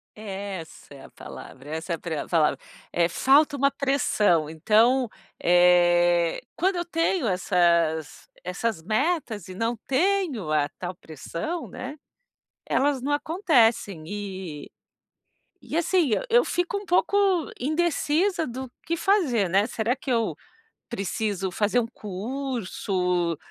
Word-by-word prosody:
Essa 195 -7 -7
é 140 - -12
a - - -14
palavra, 135 +2 -11
essa 160 +2 -3
é - - +1
a - - -13
pre 160 -3 -4
a - - -4
palavra. 160 -3 +2 0.3
Eh, 170 -1 +2
falta 280 - +4
uma 275 0 +2
pressão, 215 - +1
então, 225 +10 +3 0.3
eh, 175 -1 +4 0.2
quando 380 +2 +1
eu 345 - -1
tenho 330 -3 0
essas 170 -4 +1 0.2
essas 180 +1 -2
metas 220 - -1
e 185 - -8
não 230 +4 -1
tenho 290 - +1
a 150 -1 +2
tal 180 0 -5
pressão, 170 - -6
né, 270 +4 -7 0.7
elas 275 -2 +1
não 285 - -2
acontecem 245 - +2
e 190 -7 -6 1.0
e, - - -4
assim, 340 -4 +2 0.2
eu 480 +2 +5
fico 355 +3 -1
um 400 - -7
pouco 375 +3 +2 0.4
indecisa, 325 +4 +1
do 255 +1 -6
que 335 - 0
fazer, 310 - +2
né, 195 +4 +3
será 235 +1 -1
que 270 0 -5
eu 230 -2 +1 0.5
preciso, 200 -3 -2
fazer 210 +5 +1
um 230 - 0
curso, 195 - -2
220 Hz, 130 wpm, -25 LUFS, 175-285 Hz, 1.0 s, eu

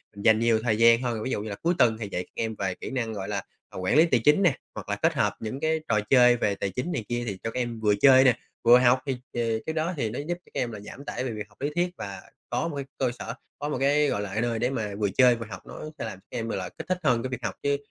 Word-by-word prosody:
mình 100 - -8
dành 110 -1 +6
nhiều 115 -1 +3
thời 110 -3 +1
gian 115 +1 +6
hơn. 115 -4 -2
Ví 130 - -3
dụ 105 - -1
như 110 - -5
là 100 - -4
cuối 170 - 0
tuần 110 -2 +4
thì 105 -3 -5
dạy 90 - -2
các - - -25
em 110 -1 -3
về 95 -2 -2
kỹ - - -7
năng, 115 -4 -2
gọi 95 -2 -5
là, 100 -2 -1 0.3
à, - - -11
quản 95 +8 0
lý 160 - +7
tài 125 -8 +2
chính 150 +7 +5
nè, 155 -7 +4 0.2
hoặc - - -7
là - - 0
kết - - +1
hợp - - +1
những 115 +5 -5
cái 160 +1 +1
trò 105 -2 +3
chơi 125 -2 +6
về 100 -3 0
tài 100 - -2
chính 125 - -3
này 110 - -3
kia 120 0 -1
thì 100 -2 -3
cho 115 - -2
các 125 - -3
em 120 -2 -3
vừa 105 -2 +3
chơi 130 +3 +7
nè, 125 -2 +4 0.3
vừa 120 +2 +8
học. 125 +1 +4
Thì, 135 - -1
ờ, - - -6 0.2
thì 115 -2 0
cái 160 - -2
đó 160 +3 -1
thì 115 -4 -1
nó 120 - -5
giúp 165 +4 -2
cho 175 - -20
các - - -2
em 120 - -2
là 105 - -7
giảm 135 +7 -10
tải 130 - -3
về 125 - -2
việc 105 -2 -6
học 105 - -25
lý 145 - 0
thuyết, 175 +1 +1
và 100 -1 -6 0.3
có 165 - -1
một 155 - -5
cái 140 -1 -4
cơ 130 -2 +1
sở, - - -5 0.3
có 145 - -3
một 150 - -1
cái, 145 +2 +3
gọi 100 -6 -1
là, 100 - -4
cái 110 - 0
nơi 115 -2 -1
để 125 +2 +1
mà 110 -6 -3
vừa 100 -2 +1
chơi, 125 -2 +6
vừa 115 0 -6
học, 95 - -8
nó - - -9 0.2
sẽ - - -3
làm 95 -4 -7
các 125 - -9
em, 115 0 -3
gọi 115 - -2
là, 90 -1 -4
kích - - -10
thích 185 0 0
hơn 125 -5 +2
cái 130 - -3
việc 125 -1 -5
học. - - -2
Chứ 140 0 +2
120 Hz, 340 wpm, -26 LUFS, 110-135 Hz, 0.3 s, vừa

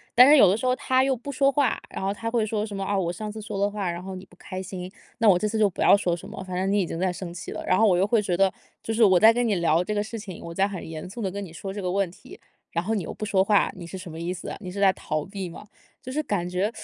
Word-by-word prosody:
但 250 +3 +9
是 300 - +8
有 205 - +8
的 190 - +3
时 225 - -6
候 255 0 +2
他 260 0 +2
又 270 -1 +2
不 265 +4 -7
说 275 +1 +3
话， 285 -1 +1
然 - - -6
后 195 +1 0
他 230 +2 -4
会 230 -2 +1
说 215 -1 -1
什 205 -2 -5
么： 195 - -2
“啊， 200 -1 0
我 170 -2 -1
上 210 +4 -5
次 215 0 -8
说 210 -1 -5
的 200 0 +1
话， 200 -4 -2
然 175 +1 -5
后 190 0 -6
你 185 - -8
不 180 - -20
开 185 +1 -7
心， 185 -1 -7 0.3
那 225 -2 +2
我 180 -3 +6
这 215 - 0
次 220 +1 -2
就 210 -1 +4
不 185 - -6
要 200 - +7
说 175 -4 0
什 170 - -10
么， - - -7
反 185 -1 -6
正 190 +2 0
你 205 - +3
已 185 - +1
经 165 - -5
在 185 -1 +1
生 175 -1 -7
气 175 - -7
了。” - - -6
然 185 - +3
后 225 - +5
我 180 -3 +4
又 190 - +3
会 220 0 +2
觉 180 -4 -1
得： 195 -1 +3 0.3
“就 225 - -2
是 225 0 +3
我 185 -4 +6
在 225 +1 +7
跟 245 0 +1
你 205 - +2
聊 170 0 +2
这 210 +2 -3
个 205 - +1
事 225 +1 -6
情， 195 -5 -8
我 170 - -7
在 195 +3 +2
很 195 -5 -7
严 160 +2 -7
肃 235 - -9
地 195 -4 -2
跟 200 +1 -5
你 175 - -9
说 190 +3 -6
这 205 - -5
个 180 - -2
问 195 -2 +1
题， - - -14 0.3
然 170 +1 -2
后 220 - 0
你 205 - 0
又 - - -6
不 215 - -5
说 190 -2 +3
话， 205 0 +3
你 175 -2 -9
是 190 - -7
什 180 -3 -8
么 160 - -8
意 170 +2 -3
思 180 - -6
啊？ - - -6
你 185 -3 -7
是 200 +2 -6
在 195 -1 +5
逃 155 -2 -3
避 195 -2 -6
吗？” 175 - -11 0.4
就 255 - -6
是 305 +3 0
感 180 -7 -1
觉 185 +4 0
195 Hz, 375 characters per minute, -25 LUFS, 180-215 Hz, 0.4 s, 但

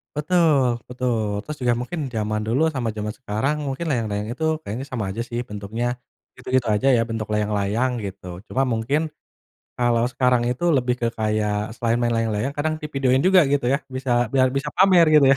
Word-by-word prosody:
Betul 150 -7 +2
betul. 125 -2 -1 0.2
Terus 150 -1 -6
juga 120 -1 +3
mungkin 165 +7 -5
zaman 110 -2 -2
dulu 120 +6 +1
sama 125 -4 -1
zaman 105 0 -3
sekarang 130 +4 -1
mungkin 135 +5 -3
layang-layang 105 -6 -1
itu 160 - -6 0.2
kayaknya 115 +7 -5
sama 120 -4 -2
aja 115 - -3
sih 120 - -3
bentuknya. 105 +3 -4 0.5
Gitu-gitu 130 -1 0
aja 105 +6 0
ya - - +3
bentuk 110 -1 -3
layang-layang 105 +3 0
gitu. 95 -1 -8 0.2
Cuma 135 - 0
mungkin, 120 +7 0 0.8
kalau 120 -1 +2
sekarang 125 -1 +2
itu 125 +7 -3
lebih 125 -1 +1
ke 120 - +1
kayak 105 -1 0 0.2
selain 115 0 0
main 120 0 +1
layang-layang 115 +3 -1
kadang 155 +2 0
di - - -2
videoin 130 -1 +2
juga 190 -1 +7
gitu 140 -4 +1
ya, 140 - +2 0.2
bisa 130 0 -3 0.2
biar 130 -1 +4
bisa 140 +2 -1
pamer 185 -2 +6
gitu 150 -2 +7
ya. - - +3
125 Hz, 185 wpm, -23 LUFS, 110-135 Hz, 0.8 s, juga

